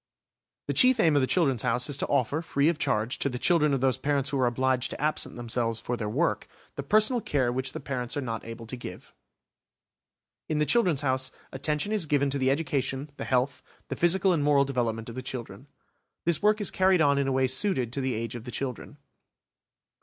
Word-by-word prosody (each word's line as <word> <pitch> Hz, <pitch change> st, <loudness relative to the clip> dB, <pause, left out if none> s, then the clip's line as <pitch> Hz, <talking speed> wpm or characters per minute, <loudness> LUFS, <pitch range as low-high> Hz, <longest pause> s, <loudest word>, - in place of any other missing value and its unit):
The -, -, -2 dB
chief 255 Hz, -1 st, +5 dB
aim 165 Hz, -6 st, +4 dB
of 145 Hz, -, +4 dB
the 130 Hz, -, +1 dB
"Children's 135 Hz, -10 st, +1 dB
House" 125 Hz, 0 st, 0 dB
is 145 Hz, -, -2 dB
to -, -, -2 dB
offer, 145 Hz, +3 st, 0 dB
free 145 Hz, -2 st, +1 dB
of 165 Hz, -2 st, -2 dB
charge, 110 Hz, 0 st, 0 dB
to 140 Hz, -, 0 dB
the 125 Hz, -, -4 dB
children 150 Hz, +2 st, +3 dB
of 135 Hz, -2 st, 0 dB
those 130 Hz, -3 st, +1 dB
parents 140 Hz, -1 st, 0 dB
who 140 Hz, -, -1 dB
are 125 Hz, -, +3 dB
obliged 130 Hz, +1 st, 0 dB
to -, -, -7 dB
absent 150 Hz, +1 st, -1 dB
themselves 115 Hz, -1 st, -2 dB
for 125 Hz, -, -3 dB
their 110 Hz, -3 st, -4 dB
work, 150 Hz, +10 st, 0 dB, 0.3 s
the -, -, -3 dB
personal 215 Hz, -, +3 dB
care 130 Hz, -9 st, 0 dB
which 130 Hz, +2 st, -2 dB
the -, -, -6 dB
parents 130 Hz, -2 st, -4 dB
are -, -, -1 dB
not 115 Hz, -4 st, -4 dB
able 115 Hz, 0 st, -8 dB
to 115 Hz, -, -6 dB
give. 120 Hz, -, -10 dB, 1.4 s
In 155 Hz, -, 0 dB
the 150 Hz, -, +2 dB
"Children's 180 Hz, -, +2 dB
House" 130 Hz, -1 st, -1 dB, 0.2 s
attention 150 Hz, +8 st, -1 dB
is 205 Hz, -7 st, 0 dB
given 140 Hz, -1 st, +1 dB
to 140 Hz, -, -1 dB
the 130 Hz, 0 st, +2 dB
education, 140 Hz, -1 st, -1 dB
the -, -, -5 dB
health, 130 Hz, +2 st, 0 dB, 0.3 s
the -, -, -3 dB
physical 180 Hz, +2 st, +3 dB
and 155 Hz, -4 st, 0 dB
moral 145 Hz, -1 st, +4 dB
development 115 Hz, -4 st, -2 dB
of 115 Hz, -, -7 dB
the 130 Hz, -, -5 dB
children. 125 Hz, -1 st, -7 dB, 0.6 s
This 170 Hz, -2 st, +2 dB
work 210 Hz, +1 st, +3 dB
is 205 Hz, -, -1 dB
carried 190 Hz, -1 st, +3 dB
on 140 Hz, -2 st, +3 dB
in 140 Hz, -, 0 dB
a -, -, 0 dB
way 130 Hz, 0 st, +2 dB
suited 130 Hz, -, +1 dB
to 140 Hz, -, -2 dB
the 130 Hz, -2 st, -1 dB
age 115 Hz, 0 st, -4 dB
of 120 Hz, -2 st, -7 dB
the -, -, -8 dB
children. 135 Hz, +3 st, -5 dB
135 Hz, 220 wpm, -27 LUFS, 125-150 Hz, 1.4 s, chief